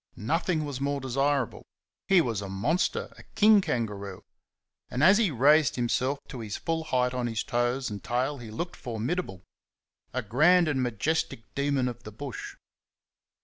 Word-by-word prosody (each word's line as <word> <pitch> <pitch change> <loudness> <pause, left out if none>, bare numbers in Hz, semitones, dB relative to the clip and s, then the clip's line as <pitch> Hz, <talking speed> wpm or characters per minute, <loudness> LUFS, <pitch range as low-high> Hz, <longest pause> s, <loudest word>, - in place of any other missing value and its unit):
Nothing 160 - 0
was 140 -2 -5
more 140 0 0
desirable. 135 -1 0 0.4
He 190 -3 +6
was 115 -8 -2
a 100 - -6
monster, 145 - -1
a - - -12
king 215 -1 +6
kangaroo; 100 - -3 0.7
and 130 +4 -1
as 190 +5 +7
he 220 -5 +3
raised 145 +3 +4
himself 125 +3 0
to 130 - -7
his 110 -3 -5
full 165 -1 -2
height 125 -4 +1
on 125 -1 -1
his 115 -1 -2
toes 120 +1 -1
and 100 -3 -6
tail 130 +6 -1
he 115 -2 -9
looked 170 +11 -5
formidable 115 - -4 0.7
a 130 0 -2
grand 155 - +4
and 140 -4 0
majestic 125 +1 -1
demon 140 -2 0
of 120 -1 -5
the 105 - -9
bush. 135 +4 -7
130 Hz, 160 wpm, -28 LUFS, 115-155 Hz, 0.7 s, as